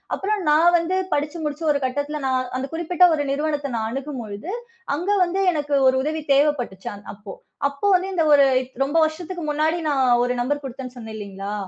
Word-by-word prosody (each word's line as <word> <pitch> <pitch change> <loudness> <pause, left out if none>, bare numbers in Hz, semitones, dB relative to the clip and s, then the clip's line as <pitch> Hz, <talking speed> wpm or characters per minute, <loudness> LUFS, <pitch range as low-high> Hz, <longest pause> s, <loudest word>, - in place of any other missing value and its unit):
அப்புறம் 415 +1 -1
நான் 325 +4 +5
வந்து 340 +2 -1 0.2
படிச்சு 295 +3 -1
முடிச்சு 300 +1 -4
ஒரு 285 - +1
கட்டத்துல, 285 +3 -2
நான் 260 -1 +1
அந்தக் 270 +3 -5
குறிப்பிட்ட 340 +2 +1
ஒரு 290 - -1
நிறுவனத்த 290 -1 -1
நான் 220 -1 -1
அணுகும் 270 0 -5
பொழுது, 210 - -7 0.4
அங்க 350 +6 -3
வந்து 360 +2 -1
எனக்கு 295 -3 -3
ஒரு 260 - +4
உதவி 310 +2 -2
தேவைப்பட்டுச்சு 275 -9 0
அன் 205 0 -12
அப்போ. 200 -1 -10 0.4
அப்போ 280 +6 -6
வந்து 370 +1 0
இந்த 340 -3 +2
ஒரு 280 -1 +7 0.4
ரொம்ப 285 +4 -1
வருஷத்துக்கு 345 +3 -5
முன்னாடி 310 +3 +1
நான் 275 -2 +2 0.2
ஒரு 245 0 0
நம்பர் 290 +4 -1
குடுத்தேன்னு 260 -1 -7
சொன்னேன் 220 -2 -8
இல்லீங்களா? 200 -1 -6
290 Hz, 185 wpm, -22 LUFS, 255-320 Hz, 0.4 s, ஒரு